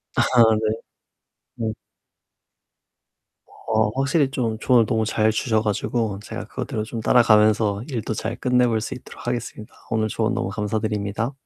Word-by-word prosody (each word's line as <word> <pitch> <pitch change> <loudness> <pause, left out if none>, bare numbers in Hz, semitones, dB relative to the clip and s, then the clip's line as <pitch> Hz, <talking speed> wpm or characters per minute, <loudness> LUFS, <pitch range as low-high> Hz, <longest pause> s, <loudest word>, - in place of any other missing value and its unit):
아. - - +3 0.4
네. 110 -1 +1 1.0
네. 110 - -2 1.9
어 110 -1 +2
확실히 140 +1 +2
좀 115 -5 -2
조언을 120 -3 +4
너무 110 -1 0
잘 110 0 +2
주셔 110 0 +1
가지고 105 0 -1
제가 - - -6
그거대로 110 - -4
좀 115 +1 -6
따라가면서 110 -2 +4
일도 115 -5 -3
잘 110 +2 -3
끝내 125 0 +2
볼 110 -2 0
수 - - -4
있도록 125 - -11
하겠습니다. 120 -3 -4 0.2
오늘 110 -1 +1
조언 115 +3 0
너무 105 -5 -2
감사드립니다. 105 +2 -2
110 Hz, 305 characters per minute, -23 LUFS, 110-120 Hz, 1.9 s, 조언을